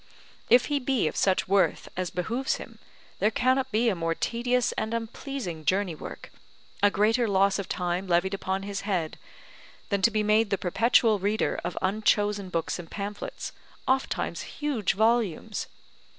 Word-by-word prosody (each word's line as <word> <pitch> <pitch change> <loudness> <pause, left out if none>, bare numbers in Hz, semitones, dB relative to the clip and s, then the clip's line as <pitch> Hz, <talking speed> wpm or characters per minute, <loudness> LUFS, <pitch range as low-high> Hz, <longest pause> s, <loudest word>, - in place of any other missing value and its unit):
If 245 +1 +6
he 290 -1 0
be 255 - +1
of - - -3
such 190 -1 +2
worth 195 0 +2
as 185 -1 -2
behooves 230 +9 -1
him, - - -10 0.4
there 210 - +4
cannot 255 +4 +1
be 230 +3 +2
a 225 - +3
more 165 -2 -1
tedious 245 +3 0
and 220 +1 -2
unpleasing 225 - -5
journey 185 +2 +1
work, 155 - -9 0.5
a 205 - +6
greater 225 +4 +2
loss 195 0 +3
of 200 - -5
time 180 +1 -2
levied 175 +2 +2
upon 195 0 -2
his 200 0 -4
head, 180 -6 -2 0.7
than 200 -1 0
to 230 - +5
be 215 -1 0
made 210 +1 +3
the 195 - +1
perpetual 220 +3 +3
reader 205 +3 0
of 175 +1 -4
unchosen 205 0 +1
books 170 0 -2
and 165 -2 -8
pamphlets, 205 - -5 0.4
ofttimes 265 +1 0
huge 280 -9 -1
volumes. 220 -4 +1
205 Hz, 160 wpm, -27 LUFS, 185-230 Hz, 0.7 s, If